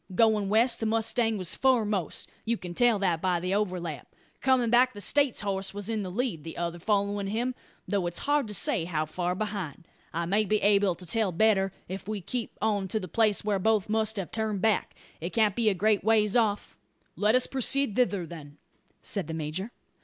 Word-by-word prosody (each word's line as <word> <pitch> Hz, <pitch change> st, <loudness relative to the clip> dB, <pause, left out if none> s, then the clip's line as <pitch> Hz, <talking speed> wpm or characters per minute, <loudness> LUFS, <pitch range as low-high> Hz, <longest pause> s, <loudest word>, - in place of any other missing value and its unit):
Goin' 215 Hz, -2 st, +3 dB
west 230 Hz, +3 st, +3 dB
the 225 Hz, -, -1 dB
mustang 225 Hz, 0 st, +1 dB
was 185 Hz, -3 st, -2 dB
foremost; 215 Hz, -, +1 dB, 0.2 s
you 230 Hz, +1 st, 0 dB
can 180 Hz, -3 st, -7 dB
tell 240 Hz, +3 st, +3 dB
that 180 Hz, -5 st, 0 dB
by 180 Hz, -2 st, +1 dB
the 180 Hz, +2 st, -2 dB
overlap. 180 Hz, -8 st, -3 dB, 0.3 s
Comin' 255 Hz, -3 st, +3 dB
back 250 Hz, +1 st, +5 dB
the -, -, -7 dB
States 280 Hz, +5 st, +1 dB
horse 195 Hz, -1 st, -2 dB
was 205 Hz, +1 st, -5 dB
in 220 Hz, -2 st, -1 dB
the 190 Hz, -, -4 dB
lead, 200 Hz, -, -2 dB
the 165 Hz, -, -8 dB
other 170 Hz, 0 st, -3 dB
followin' 200 Hz, +1 st, 0 dB
him; 235 Hz, +5 st, -1 dB, 0.3 s
though 195 Hz, -4 st, 0 dB
it's 175 Hz, -, -4 dB
hard 290 Hz, -3 st, +2 dB
to 210 Hz, -, -6 dB
say 240 Hz, -, +1 dB
how 155 Hz, -3 st, -1 dB
fur 175 Hz, +3 st, -2 dB
behind. 190 Hz, -6 st, -5 dB, 0.2 s
I 170 Hz, +1 st, -2 dB
may 200 Hz, +5 st, +2 dB
be 215 Hz, +1 st, +1 dB
able 200 Hz, -2 st, +4 dB
to 180 Hz, -, -11 dB
tell 215 Hz, +2 st, 0 dB
better, 195 Hz, +1 st, +3 dB, 0.2 s
if 190 Hz, +1 st, -7 dB
we 215 Hz, -1 st, -2 dB
keep 230 Hz, +5 st, -4 dB
on 205 Hz, -3 st, +1 dB
to 215 Hz, +4 st, -1 dB
the 185 Hz, -, -6 dB
place 215 Hz, +2 st, +2 dB
whar 205 Hz, -2 st, 0 dB
both 215 Hz, 0 st, +1 dB
must 220 Hz, 0 st, 0 dB
have 190 Hz, -3 st, -4 dB
turned 220 Hz, -2 st, -1 dB
back. 220 Hz, -3 st, +1 dB, 0.2 s
It 170 Hz, +3 st, -5 dB
can't 215 Hz, -3 st, +2 dB
be 230 Hz, -2 st, +3 dB
a 200 Hz, -, 0 dB
great 210 Hz, +2 st, +2 dB
ways 215 Hz, -1 st, +3 dB
off." 215 Hz, -4 st, +1 dB, 0.4 s
"Let 210 Hz, +3 st, +3 dB
us 255 Hz, -, +4 dB
proceed 270 Hz, -3 st, 0 dB
thither, 205 Hz, -8 st, +1 dB
then," 150 Hz, -3 st, -11 dB, 0.5 s
said 195 Hz, -7 st, -2 dB
the 160 Hz, -, -4 dB
major. 160 Hz, +7 st, -4 dB
205 Hz, 205 wpm, -28 LUFS, 180-225 Hz, 0.5 s, back